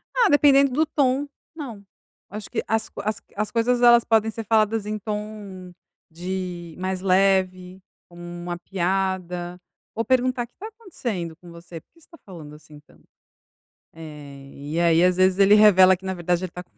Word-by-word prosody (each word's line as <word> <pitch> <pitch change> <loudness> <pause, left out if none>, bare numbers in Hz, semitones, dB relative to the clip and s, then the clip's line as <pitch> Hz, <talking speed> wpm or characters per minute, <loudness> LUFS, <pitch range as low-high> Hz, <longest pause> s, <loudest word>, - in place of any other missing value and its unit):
Ah, 475 -4 +4
dependendo 280 -2 +5
do 310 +5 +1
tom, 275 -1 0 0.3
não. 240 -10 -8 0.5
Acho 210 +1 -8
que - - -3
as 220 0 -1
as 215 +1 -3
as 210 +1 -3
coisas, 240 +1 +1
elas 240 -1 +6
podem 225 -1 +1
ser 225 - -6
faladas 220 -1 +1
em 215 0 -3
tom 210 -3 -7 0.4
de 175 -1 -6
mais 185 0 -3
leve, 185 -1 +1 0.3
como 175 0 -14
uma 175 0 -6
piada, 180 -1 -3 0.4
ou 230 - -2
perguntar: 255 -1 +1
"O - - -10
que 245 - -44
tá 420 - -8
acontecendo 240 - -6
com 175 -1 -15
você, 170 0 -11
por - - -52
que 335 - -25
você - - -21
tá 335 - -16
falando 160 -6 -11
assim 150 0 -16
tanto?". - - -25 0.9
Eh, 145 -4 -11
e 145 +4 -5
aí 170 0 +3
às 180 0 +3
vezes 185 0 +3
ele 200 +1 +5
revela 190 -3 +6
que 190 - -15
na 190 - -2
verdade 175 0 -1
ele 180 - -9
tá 180 - -8
com - - -42
190 Hz, 180 wpm, -23 LUFS, 175-225 Hz, 0.9 s, elas